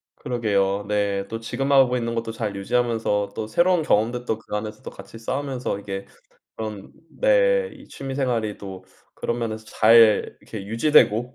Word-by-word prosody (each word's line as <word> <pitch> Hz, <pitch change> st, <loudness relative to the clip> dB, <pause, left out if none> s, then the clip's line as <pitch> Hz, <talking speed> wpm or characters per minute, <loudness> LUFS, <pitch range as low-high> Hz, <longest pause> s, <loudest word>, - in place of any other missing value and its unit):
그러게요. 105 Hz, -6 st, 0 dB
네. 100 Hz, -1 st, 0 dB
또 115 Hz, -, -5 dB
지금 135 Hz, +5 st, -3 dB
하고 130 Hz, -2 st, +5 dB
있는 115 Hz, -1 st, -2 dB
것도 115 Hz, 0 st, -3 dB
잘 110 Hz, -3 st, -4 dB
유지하면서 105 Hz, -1 st, 0 dB
또 110 Hz, -, -4 dB
새로운 175 Hz, +8 st, +3 dB
경험들도 120 Hz, -2 st, 0 dB
그 105 Hz, -, -6 dB
안에서 105 Hz, 0 st, -5 dB
또 -, -, -7 dB
같이 115 Hz, -, -12 dB
쌓으면서 130 Hz, -2 st, -3 dB
이게 95 Hz, -1 st, -6 dB, 0.5 s
그런 105 Hz, -3 st, -6 dB, 0.3 s
네 -, -, +3 dB
이 -, -, -15 dB
취미생활이 125 Hz, -6 st, -2 dB
또 95 Hz, -2 st, -9 dB, 0.3 s
그런 120 Hz, 0 st, -3 dB
면에서 110 Hz, -1 st, -4 dB
잘 110 Hz, 0 st, +5 dB
이렇게 100 Hz, -3 st, -8 dB
유지되고 120 Hz, 0 st, +3 dB
115 Hz, 340 characters per minute, -23 LUFS, 105-125 Hz, 0.5 s, 하고